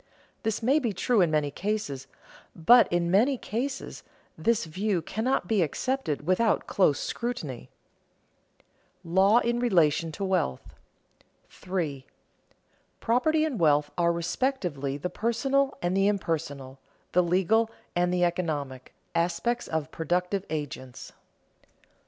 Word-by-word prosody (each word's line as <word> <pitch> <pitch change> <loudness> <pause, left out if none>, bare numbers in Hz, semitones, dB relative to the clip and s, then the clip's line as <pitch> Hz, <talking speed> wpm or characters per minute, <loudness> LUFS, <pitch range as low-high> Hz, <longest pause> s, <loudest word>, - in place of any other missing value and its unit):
This 220 0 -2
may 270 +6 +4
be 235 -7 -1
true 220 +3 +2
in 175 - +3
many 150 -2 0
cases, 195 -9 -3 0.5
but 235 +9 +6
in 175 0 +1
many 245 +8 +3
cases 260 +5 -4 0.3
this 230 -3 +1
view 185 +4 -1
cannot 220 +3 -1
be 210 -2 +2
accepted 165 - -2
without 195 +6 +2
close 155 -8 +2
scrutiny. 165 - -4 1.3
[Sidenote: 170 0 -7
Law 195 +4 +6
in 240 0 +1
relation 165 -8 +2
to 200 - -5
wealth] 185 - -1 0.8
3. 160 -8 -4 0.9
_Property 310 +7 +2
and 275 -9 -3
wealth 150 -2 +3
are 170 -1 +2
respectively 170 - -2
the 180 +5 -4
personal 270 +7 0
and 175 +2 0
the 195 +1 +3
impersonal, 145 -9 -3 0.3
the 180 - +4
legal 190 +6 +2 0.3
and 175 0 +2
the 180 0 +1
economic, 150 -7 -2 0.2
aspects 175 +8 0
of 160 -1 -3
productive 180 +4 -1
agents. 145 -4 -6
180 Hz, 120 wpm, -27 LUFS, 155-230 Hz, 1.3 s, but